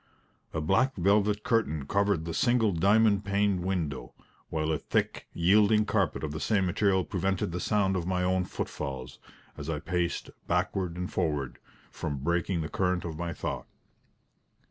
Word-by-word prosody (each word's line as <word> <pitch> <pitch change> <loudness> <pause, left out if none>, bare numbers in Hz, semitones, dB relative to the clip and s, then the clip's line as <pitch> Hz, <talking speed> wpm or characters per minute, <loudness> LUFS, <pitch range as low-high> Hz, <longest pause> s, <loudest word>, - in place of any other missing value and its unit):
A 80 - -2
black 95 - +2
velvet 105 +3 +2
curtain 80 - +1
covered 100 -1 +1
the 85 - -4
single 120 +1 +3
diamond 100 +4 +4
paned 100 -2 +1
window; 80 -10 -3 0.3
while 80 0 -1
a 80 - 0
thick, - - -1
yielding 105 +4 +4
carpet 100 -9 0
of 75 - -2
the 75 - -4
same 95 +6 +1
material 95 +1 +2
prevented 95 -1 -1
the 90 - -3
sound 95 0 +1
of 90 -2 -2
my 90 -1 0
own 90 0 +1
footfalls, 65 -7 -5 0.4
as 75 +2 -6
I 80 -2 -1
paced 85 +2 -2 0.2
backward 90 -3 0
and 90 0 -4
forward, 75 -7 -1 0.3
from 75 -4 -4
breaking 85 +4 0
the 80 - -3
current 90 0 0
of 80 -2 -4
my 85 -1 -2
thought. - - -4
90 Hz, 160 wpm, -29 LUFS, 80-100 Hz, 0.4 s, diamond